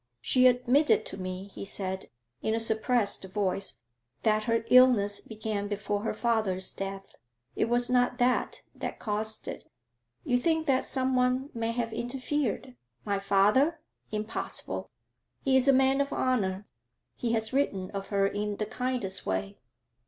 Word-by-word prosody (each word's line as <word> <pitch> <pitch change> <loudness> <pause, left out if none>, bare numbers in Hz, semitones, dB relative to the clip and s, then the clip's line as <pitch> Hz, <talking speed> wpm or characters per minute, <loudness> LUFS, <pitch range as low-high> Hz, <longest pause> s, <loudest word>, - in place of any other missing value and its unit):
'She 255 - +4
admitted 250 +1 +3
to - - -6
me,' 185 0 -5
he - - -8
said, 190 -1 -4 0.3
in 220 - 0
a - - 0
suppressed 220 -1 +1
voice, 190 - -2 0.4
'that 215 -1 +2
her 230 0 +1
illness 240 -6 +6
began 215 -2 -4
before 205 0 -2
her 225 - -2
father's 215 -6 0
death. 195 0 -6 0.4
It - - +2
was 240 0 +3
not 250 0 +2
that 250 0 +1
that - - -5
caused 215 0 -3
it. - - -7 0.5
You 245 0 +2
think 320 +3 +1
that 265 -3 +2
someone 255 +1 +1
may 230 -1 -2
have 230 -1 -2
interfered? 255 - -2 0.3
My 200 -1 0
father? 210 +12 +3 0.3
Impossible! 215 +1 -4 0.6
He 265 -1 +3
is 265 0 +4
a - - +8
man 270 +1 +4
of 280 0 -2
honour; 205 -6 0 0.5
he 235 -1 -1
has 220 +1 0
written 200 -9 0
of 195 -1 -5
her 200 -1 +1
in 205 +1 -2
the 215 - -1
kindest 245 -4 -2
way.' 95 +1 -2
220 Hz, 150 wpm, -29 LUFS, 200-255 Hz, 0.6 s, a